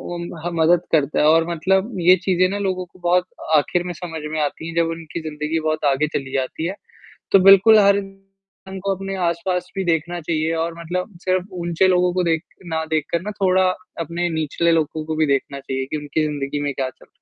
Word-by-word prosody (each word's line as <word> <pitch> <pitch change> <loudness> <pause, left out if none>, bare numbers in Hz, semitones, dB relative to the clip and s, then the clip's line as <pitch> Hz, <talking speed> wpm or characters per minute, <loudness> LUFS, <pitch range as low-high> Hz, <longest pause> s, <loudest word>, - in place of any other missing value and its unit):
उम, 170 - -5 0.2
हाँ 175 - -2
मदद 170 +1 +3
करता 150 -2 +2
है - - +4
और 165 +1 +4
मतलब 190 +6 +1
ये 180 +2 +7
चीज़ें 185 -1 +3
ना 200 - -2
लोगों 185 -2 -2
को 180 - -22
बहुत 180 +1 +2 0.3
आखिर 175 +4 +1
में 180 - -4
समझ 160 -1 -7
में 155 - -2
आती 150 +2 -3
हैं 165 - -8
जब 170 -1 +2
उनकी 165 0 -6
ज़िंदगी 150 +1 -2
बहुत 155 -1 -1
आगे 140 +3 +1
चली 135 -2 -3
जाती 135 +4 -2
है। 190 - -4 0.6
तो 195 - +7
बिल्कुल 195 +3 +8
हर 200 -1 +5
इंसान 195 -1 -10
को 195 -1 0
अपने 195 +1 -5
आस-पास 180 +2 -2
भी 190 - 0
देखना 170 +1 0
चाहिए 160 0 -1
और 170 0 -3
मतलब 180 +4 -4
सिर्फ़ 185 0 +1
ऊँचे 170 +2 +2
लोगों 180 -1 +3
को 185 - +1
देख 160 -1 +1 0.3
ना 160 - 0
देखकर 155 +2 -1
ना 210 +3 -5
थोड़ा 185 0 +4 0.3
अपने 170 +2 -2
निचले 160 +2 +1
लोगों 155 -1 0
को 160 - -3
भी 155 -1 +2
देखना 140 0 -2
चाहिए 135 -1 -3
कि 155 - -1
उनकी 150 +1 -2
ज़िंदगी 145 -1 -3
में 140 - -2
क्या 130 -1 -2
चल - - -20
170 Hz, 215 wpm, -21 LUFS, 155-185 Hz, 0.6 s, बिल्कुल